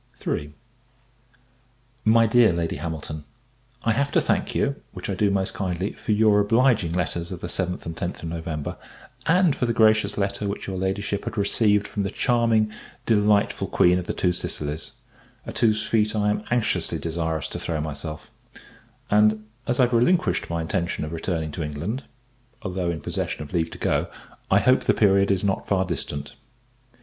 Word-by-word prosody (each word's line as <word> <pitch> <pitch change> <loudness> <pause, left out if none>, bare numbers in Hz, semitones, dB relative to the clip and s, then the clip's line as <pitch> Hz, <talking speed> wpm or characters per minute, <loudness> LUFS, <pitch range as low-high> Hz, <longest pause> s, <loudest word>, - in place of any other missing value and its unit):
MY 115 +1 +6
DEAR 115 -1 +5
LADY 85 -1 -2
HAMILTON, 80 -2 -5 0.6
I 115 - +2
have 140 +5 0
to - - +5
thank - - 0
you, - - +1 0.2
which - - -5
I - - 0
do 105 - +2
most 95 -1 0
kindly, 95 0 -2
for - - -4
your 105 -1 +4
obliging 110 -4 +3
letters 85 -1 -2
of 90 - -5
the - - -4
7th 90 +1 -2
and 80 - -5
10th 85 +1 -4
of 85 - -3
November; 80 -3 -4 0.5
and 180 -2 +4
for 125 - -1
the 115 - 0
gracious 110 -2 +4
letter 100 0 -1
which 100 - -4
your 95 - -4
Ladyship 100 +1 -2
had - - -5
received 105 0 +2
from 105 - -3
the 100 - -1
charming, 115 -2 +2 0.3
delightful 105 -2 +2
Queen 90 +1 +4
of 90 - -7
the - - -1
Two 90 - +1
Sicilies, 75 -3 -2 0.5
at - - -5
whose 110 -2 +3
feet 110 -1 +1
I 105 -1 +2
am 105 0 -3
anxiously 120 -2 0
desirous 80 -1 -2
to - - -5
throw 80 -2 -2
myself: 75 0 -6 0.8
and, 105 +1 +4 0.2
as 120 - 0
I - - +7
have 125 0 +1
relinquished 170 +10 +2
my 85 -1 -1
intention 85 -2 -2
of 75 - -6
returning 80 -1 -2
to 85 - -5
England, 80 - -4 0.6
(although 90 -1 -2
in 85 -2 -3
possession - - -3
of 75 - -12
leave 85 -2 +1
to - - -9
go) - - 0 0.4
I 100 +1 +5
hope 130 +3 +3
the - - +3
period 100 -1 +4
is 95 -1 +1
not 100 -1 -1
far 95 -2 +2
distant. 75 -4 -4
100 Hz, 180 wpm, -24 LUFS, 85-110 Hz, 0.8 s, I